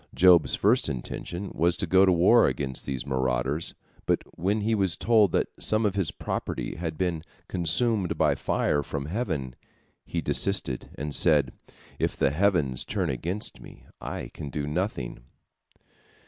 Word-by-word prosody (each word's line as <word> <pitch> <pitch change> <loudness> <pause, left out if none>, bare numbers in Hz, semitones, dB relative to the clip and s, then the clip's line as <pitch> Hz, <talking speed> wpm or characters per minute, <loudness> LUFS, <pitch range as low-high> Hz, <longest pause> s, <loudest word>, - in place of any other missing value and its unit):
Job's 90 -3 +5
first - - +2
intention 85 +8 -5
was 85 +2 +2
to 100 - 0
go 95 +2 +5
to - - +5
war 90 +7 +5
against 65 0 -3
these 65 -2 -3
marauders, 65 +3 -1 0.3
but - - +1
when 100 +5 0
he 110 +2 0
was 95 -5 0
told 110 -5 +4
that - - +1
some 110 +1 +2
of 100 - +1
his 95 -5 +1
property - - -4
had 80 -2 -4
been 85 -3 -1 0.3
consumed 95 0 +1
by 75 -2 +3
fire 70 +1 0
from 70 0 -5
heaven, 75 - -3 0.5
he - - -4
desisted, 65 -2 0
and 75 +1 -5
said, 75 -7 +3 0.5
"If - - -1
the 70 - +2
heavens 80 -6 +1
turn - - -2
against 85 - -4
me, - - -14 0.2
I - - -5
can 75 - -7
do 70 +1 -3
nothing." 75 - -3
80 Hz, 155 wpm, -26 LUFS, 70-95 Hz, 0.5 s, Job's